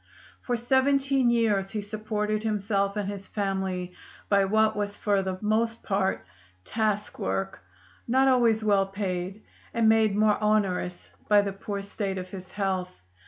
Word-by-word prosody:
For 245 -1 -1
seventeen 270 +1 +2
years 215 -5 +2
he 210 +1 -3
supported 215 0 -2
himself 200 -2 0
and 205 -2 -1
his 200 -1 -6
family 190 -3 -2 0.4
by 200 -1 +4
what 220 +2 +2
was 205 -1 -2
for 200 -2 +1
the 190 -1 -3
most 225 +2 0
part 190 - 0 0.4
task 215 -2 -1
work, 95 0 -2 0.5
not 265 +3 +3
always 235 -4 +3
well 200 -2 +3
paid, 195 0 -4 0.3
and 230 -1 +3
made 220 -2 +4
more 215 0 +3
onerous 195 -4 0 0.2
by 205 -1 +5
the 200 -1 -3
poor 200 0 -5
state 195 -1 -3
of 185 0 -6
his 185 -2 -9
health. 190 -3 -1
205 Hz, 150 wpm, -27 LUFS, 195-220 Hz, 0.5 s, by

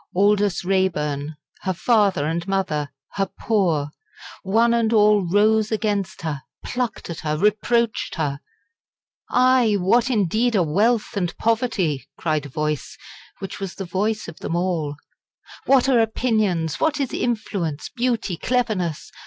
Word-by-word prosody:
Aldous 200 -1 +2
Raeburn, 155 -6 0 0.3
her 190 - -1
father 200 -8 +2
and 165 +3 -2
mother, 175 -7 -1 0.2
her 195 -1 -1
poor 170 -10 +1 0.5
one 225 +5 +3
and 230 -1 +2
all 210 -2 +5
rose 210 +4 +2
against 205 -5 -1
her 150 -4 -3 0.2
plucked 245 -7 -3
at 170 - -6
her 155 -1 -2
reproached 220 +4 +1
her. 145 -3 -2 0.9
"Aye! 255 -3 +4
what, 230 +7 +3
indeed, 225 +1 +1
are 190 - +4
wealth 210 +10 +1
and 180 -4 -2
poverty?" 220 - 0
cried 155 -3 -1
a - - -13
voice, 150 +1 -3 0.4
which 195 - -7
was 195 -2 -5
the 195 - -5
voice 210 +5 -1
of 170 - -10
them 165 - -3
all; 170 -5 -1 0.7
"what 270 -1 +5
are 255 -3 +4
opinions 215 -8 0
what 310 -2 +1
is 275 -3 -2
influence, 195 -10 -2
beauty, 235 -7 -1
cleverness? 210 - -1
195 Hz, 135 wpm, -22 LUFS, 165-225 Hz, 0.9 s, all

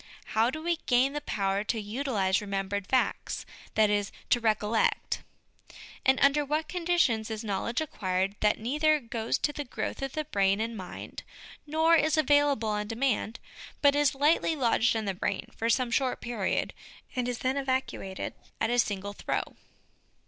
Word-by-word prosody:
How 225 +2 +4
do 310 +4 -5
we 340 0 +1
gain 255 +2 +3
the 295 - -3
power 195 -6 -1
to 225 - -1
utilise 210 -4 0
remembered 200 -1 -3
facts 260 -1 0 0.3
that 215 -1 +4
is, 205 -1 0 0.2
to 240 - +5
recollect 220 -1 +1 0.4
'? - - -17
And 265 0 +5
under 280 +1 +5
what 305 +3 -1
con 355 -2 -5
ditions 235 -12 +2
is 220 0 -4
knowledge 220 +5 -1
acquired 190 -8 -1
that 210 0 +3
neither 300 +7 +2
goes 230 -3 -2
to 295 - -1
the 295 - -4
growth 255 - -4
of 295 +3 -4
brain 195 0 +2
and 230 +1 -2
mind, 185 -4 -7 0.5
nor 320 +2 +3
is 310 0 +3
available 290 -6 +3
on 210 0 -1
demand, 230 -1 -1 0.4
but 285 0 +6
is 290 -1 +3
lightly 305 +3 +3
lodged 240 -4 +2
in 220 -1 -1
the 195 - -1
brain 180 - -2
for 230 - -1
some 245 0 +2
short 255 0 +1
period, 225 -5 -1 0.4
and 250 -1 0
is 245 - -2
then 260 +2 0
evacuated 260 -8 -2 0.3
at 225 - +1
a 245 - +2
single 205 -2 -1
throw - - -3
240 Hz, 170 wpm, -29 LUFS, 210-285 Hz, 0.5 s, but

